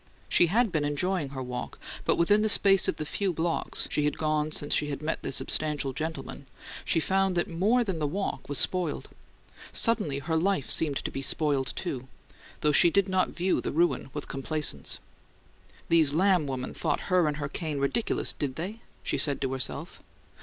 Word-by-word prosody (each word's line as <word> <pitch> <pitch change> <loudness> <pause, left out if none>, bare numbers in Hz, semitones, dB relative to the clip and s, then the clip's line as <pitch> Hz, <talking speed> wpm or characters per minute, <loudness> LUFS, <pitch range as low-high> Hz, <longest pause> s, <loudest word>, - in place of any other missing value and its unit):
She 175 - +5
had 220 +4 +2
been 155 -3 0
enjoying 145 +2 0
her 135 -1 -5
walk, 125 0 -5 0.3
but - - +3
within 205 +5 +4
the 215 - +2
space 195 -2 +4
of - - 0
the 155 - -5
few 195 +5 -1
blocks 165 0 -1
she 150 - +1
had 150 - 0
gone 155 0 0
since 145 -1 0
she 150 0 +1
met 155 +3 -3
the - - -4
substantial 145 0 -1
gentleman, 145 -2 -5 0.4
she 165 - +1
found 190 +2 +1
that 175 - +1
more 210 +9 +2
than 190 -7 -3
the 150 - 0
walk 180 -5 -3
was 145 - 0
spoiled: 175 +2 0 0.6
suddenly 210 - +2
her 150 +4 -2
life 175 -3 +1
seemed 145 -4 +2
to - - -4
be 135 - -4
spoiled, 140 -1 0
too; 130 -8 -4 0.5
though 150 - +3
she 170 - +6
did 200 +2 +2
not 185 -1 +2
view 185 +2 0
the - - -3
ruin 155 -5 +1
with 150 +1 -5
complaisance. 135 - -2 0.9
These 160 -3 +4
Lamb 180 -3 +3
women 130 -1 -4
thought - - -1
her 180 -3 +4
and 150 -1 -1
her 145 -1 -3
cane 155 0 -4
ridiculous, 140 +12 0
did 135 -3 -3
they? 195 +8 -5 0.2
she - - -1
said 145 -2 +3
to 135 -1 -1
herself. 130 -1 -3
155 Hz, 190 wpm, -28 LUFS, 140-185 Hz, 0.9 s, she